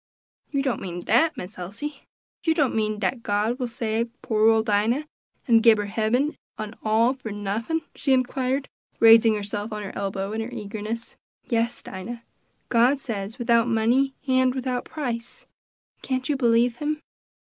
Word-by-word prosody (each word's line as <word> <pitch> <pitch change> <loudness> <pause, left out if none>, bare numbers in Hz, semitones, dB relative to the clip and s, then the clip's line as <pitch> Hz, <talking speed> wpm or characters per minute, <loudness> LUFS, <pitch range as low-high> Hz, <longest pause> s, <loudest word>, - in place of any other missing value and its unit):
'" - - -52
"You 280 -2 0
don't 260 -4 -1
mean 175 -1 -5
dat, 275 - +3
Miss 185 -2 -7
Elsie! 230 - -6 0.4
You 325 -1 +2
don't 290 -5 +2
mean 215 -1 0
dat 215 +4 -1
God 215 +4 0
will 250 - -1
save 230 0 -1
poor 220 0 +3
ole 225 -1 +4
Dinah, 220 +7 +1 0.4
an' 230 -2 +6
gib 225 -1 +6
her 205 - -1
hebben, 225 +8 0 0.2
an' 215 0 -5
all 225 +3 +3
for 255 -5 -7
nuffin?" 210 +10 -2
she 275 - -1
inquired, 260 +1 +1 0.3
raising 225 -1 +7
herself 205 +1 -4
on 210 -1 -4
her 195 - -7
elbow 195 0 -3
in 220 - -2
her 225 - -4
eagerness. 220 0 -5 0.3
"Yes, 235 -1 0
Dinah; 230 +5 -7 0.5
God 245 +4 +4
says 220 -5 -5
without 235 -1 +3
money 240 +4 +2
and 260 0 +3
without 255 -1 -2
price; 240 -6 -3 0.6
can't 260 -1 -2
you 295 - +1
believe 240 -2 +3
him? 300 +2 -2
230 Hz, 165 wpm, -25 LUFS, 215-255 Hz, 0.6 s, raising